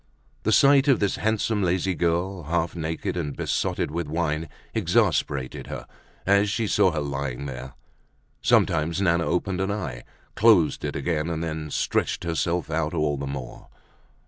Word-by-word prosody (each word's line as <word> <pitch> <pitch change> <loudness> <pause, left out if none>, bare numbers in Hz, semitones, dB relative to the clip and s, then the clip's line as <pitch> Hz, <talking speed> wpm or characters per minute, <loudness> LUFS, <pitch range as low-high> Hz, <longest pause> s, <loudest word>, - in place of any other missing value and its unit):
The 110 - 0
sight 140 +4 +6
of 135 - +5
this 100 -2 0
handsome 110 0 0
lazy 90 0 +1
girl, 85 +1 -1
half 85 +2 -1
naked 80 +1 -3
and 75 -5 -3
besotted - - -1
with 85 0 -3
wine, 80 0 -1 0.2
exasperated 65 -3 0
her, - - -6 0.4
as 100 +1 +4
she 110 +3 0
saw 100 -2 +3
her 80 -3 -2
lying 70 -2 -3
there. 65 -1 -7 0.7
Sometimes 80 +3 +2
Nana 85 -3 +2
opened 90 +1 0
an 95 - 0
eye, 65 -13 -4 0.3
closed 105 -8 +4
it - - -3
again, 80 +1 -1
and 80 -1 -2
then 80 -2 -4
stretched - - 0
herself 85 0 -1
out 80 +1 -1
all 75 -2 +1
the 70 0 -4
more. 70 -3 -7
85 Hz, 155 wpm, -25 LUFS, 75-95 Hz, 0.7 s, sight